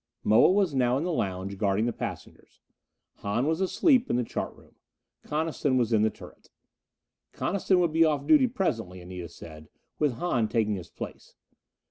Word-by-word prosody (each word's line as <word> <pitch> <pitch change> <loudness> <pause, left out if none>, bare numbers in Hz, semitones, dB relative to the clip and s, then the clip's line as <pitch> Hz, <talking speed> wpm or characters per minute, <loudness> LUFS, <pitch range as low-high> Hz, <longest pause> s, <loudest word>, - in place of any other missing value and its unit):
Moa 110 +10 +5
was 190 -5 +2
now 125 -1 +2
in 145 - -2
the 175 0 -1
lounge, 95 -4 -3
guarding 100 +1 +1
the 120 - -1
passengers. - - -8 0.6
Hahn 105 +6 -1
was 160 +4 0
asleep 255 - +3
in - - +1
the 125 - +1
chart - - -4
room; - - -21 0.5
Coniston 150 -3 -1
was 120 -2 +1
in 110 - +4
the 110 - +3
turret. - - -14 0.8
Coniston 190 -1 +1
would 170 -3 +1
be 165 +1 +5
off 150 -3 +1
duty 265 - +5
presently, 115 - -2
Anita 90 -1 -8
said, 80 -2 -12 0.3
with 150 -4 +2
Hahn 120 -4 0
taking 110 -3 +1
his 90 -4 -6
place. - - -9
125 Hz, 170 wpm, -27 LUFS, 100-165 Hz, 0.8 s, Moa